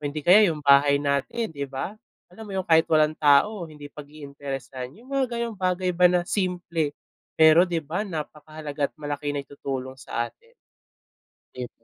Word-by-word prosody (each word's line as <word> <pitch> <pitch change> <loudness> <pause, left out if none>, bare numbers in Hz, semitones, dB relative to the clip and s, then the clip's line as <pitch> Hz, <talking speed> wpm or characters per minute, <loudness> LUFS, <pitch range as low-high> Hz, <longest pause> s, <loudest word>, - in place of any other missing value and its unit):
hindi 145 +1 -3
kaya 200 +3 +7
'yung 155 -2 -4
bahay 140 0 +6
natin 145 - -1
'di 140 -2 -4
ba, 135 +8 -4 0.4
alam 220 +4 -10
mo - - -7
'yung 190 - -1
kahit 160 -2 +5
walang 155 -1 +4
tao 160 +7 +3
hindi 150 -2 -12
pag-iinteresan. 140 -2 -8
'Yung 245 +4 -17
mga 275 -1 +2
gano'ng 235 -2 -3
bagay 185 0 0
ba 180 0 +6
na 180 - +2
simple, 175 -6 -1 0.5
pero 160 +2 +7
di 170 -2 -1
ba 160 +7 -3
napakahalaga 155 -4 -5
at - - -46
malaki 145 0 -4
naitutulong 135 -2 -5
sa 120 0 -3
atin. 470 +1 -27 1.0
'Di 125 - -5
ba? - - -19
155 Hz, 165 wpm, -25 LUFS, 140-180 Hz, 1.0 s, kaya